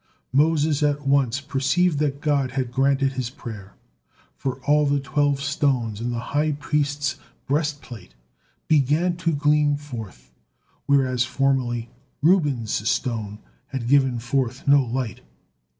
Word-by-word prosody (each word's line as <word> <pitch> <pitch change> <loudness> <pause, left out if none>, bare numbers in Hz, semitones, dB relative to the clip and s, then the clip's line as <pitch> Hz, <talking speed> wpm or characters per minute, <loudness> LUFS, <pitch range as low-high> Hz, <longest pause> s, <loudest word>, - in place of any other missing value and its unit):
Moses 150 +1 +2
at 145 -1 0
once 135 -2 +2
perceived 145 +4 +1
that 145 -1 -1
God 140 -4 0
had 130 -2 -2
granted 135 +1 +2
his 130 -3 -3
prayer, 110 -8 -10 0.6
for 130 -2 -3
all 150 0 +3
the 140 0 +2
twelve 145 0 0
stones 135 -6 -1
in 120 - -2
the 120 -1 -2
high 150 +1 +2
priest's 145 -1 -1 0.3
breastplate 140 - -3 0.5
began 155 +4 +2
to 165 -1 0
gleam 145 0 +2
forth, 115 - -9 0.6
whereas 130 -3 +3
formerly 125 -3 0 0.3
Reuben's 140 - +2
stone 110 -4 -2 0.3
had 130 -3 -4
given 135 -2 +3
forth 125 +1 -2
no 140 -1 +6
light. 120 -3 -4
140 Hz, 125 wpm, -23 LUFS, 125-145 Hz, 0.6 s, no